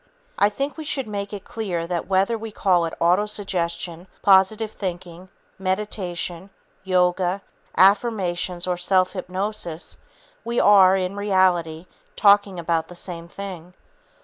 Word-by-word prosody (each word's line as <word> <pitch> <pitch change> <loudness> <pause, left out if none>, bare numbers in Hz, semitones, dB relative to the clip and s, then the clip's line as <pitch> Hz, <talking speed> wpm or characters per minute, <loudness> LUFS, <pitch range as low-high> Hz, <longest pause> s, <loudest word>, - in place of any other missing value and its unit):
I 205 - +5
think 275 +9 -4
we 315 - -5
should 280 -3 -2
make 200 -2 -5
it 205 -2 -7
clear 185 -7 -3
that 175 0 -3
whether 195 +4 +2
we 225 0 -6
call 180 -4 +2
it 165 - -6
autosuggestion, 180 -2 -1 0.2
positive 205 +3 +4
thinking, 180 -2 -6 0.3
meditation, 185 -2 -3 0.3
yoga, 185 +1 +1 0.3
affirmations 190 -3 +2
or 180 -1 -1
self 185 +1 +2
hypnosis, 185 -2 -4 0.5
we 235 +1 -1
are, 195 -2 +6
in 185 +1 -2
reality, 185 -5 +1 0.3
talking 200 -2 +4
about 165 -1 -1
the 175 - -12
same 170 -1 -7
thing. 180 -2 -8
185 Hz, 125 wpm, -23 LUFS, 175-205 Hz, 0.5 s, are